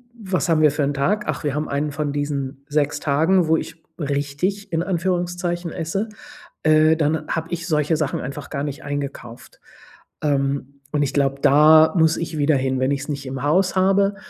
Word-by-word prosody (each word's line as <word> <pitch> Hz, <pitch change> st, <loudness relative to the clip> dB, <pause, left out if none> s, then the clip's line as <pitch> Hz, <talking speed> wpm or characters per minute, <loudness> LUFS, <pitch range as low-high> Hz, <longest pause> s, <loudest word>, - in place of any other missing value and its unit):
was 190 Hz, -5 st, -2 dB
haben 155 Hz, -1 st, +3 dB
wir 150 Hz, -2 st, +5 dB
für 145 Hz, 0 st, -1 dB
'n 145 Hz, +1 st, 0 dB
Tag? 205 Hz, +10 st, 0 dB
Ach, -, -, -3 dB
wir 145 Hz, -, -1 dB
haben 150 Hz, +1 st, -2 dB
einen 145 Hz, +1 st, -1 dB
von 145 Hz, -1 st, -3 dB
diesen 140 Hz, -1 st, -3 dB
6 145 Hz, -1 st, 0 dB
Tagen, 160 Hz, +4 st, +2 dB
wo 160 Hz, 0 st, +4 dB
ich 165 Hz, -1 st, -7 dB, 0.2 s
richtig, 145 Hz, +8 st, -2 dB
in 165 Hz, +1 st, +1 dB
Anführungszeichen, 175 Hz, -1 st, -2 dB
esse. 185 Hz, +6 st, -3 dB, 0.6 s
Äh, 155 Hz, 0 st, +5 dB
dann 155 Hz, 0 st, 0 dB
habe 165 Hz, 0 st, -3 dB
ich 170 Hz, -1 st, -4 dB
solche 155 Hz, -1 st, +1 dB
Sachen 155 Hz, -3 st, -2 dB
einfach 140 Hz, +3 st, -7 dB
gar 140 Hz, -2 st, -3 dB
nicht 145 Hz, +1 st, -5 dB
eingekauft. 140 Hz, -4 st, -6 dB, 0.6 s
Ähm, 140 Hz, -1 st, -1 dB
und 150 Hz, -, 0 dB
ich 140 Hz, -, -2 dB
glaube, 140 Hz, -1 st, 0 dB
da 155 Hz, +2 st, +6 dB
muss 160 Hz, 0 st, +4 dB
ich 165 Hz, -2 st, -4 dB
wieder 145 Hz, +1 st, +3 dB
hin, 130 Hz, -1 st, 0 dB
wenn 130 Hz, +1 st, +1 dB
ich 140 Hz, -1 st, -1 dB
es 145 Hz, -, -8 dB
nicht 140 Hz, -1 st, -4 dB
im 130 Hz, 0 st, -5 dB
Haus 180 Hz, +7 st, +2 dB
habe, 195 Hz, +1 st, +3 dB
150 Hz, 195 wpm, -21 LUFS, 140-170 Hz, 0.6 s, da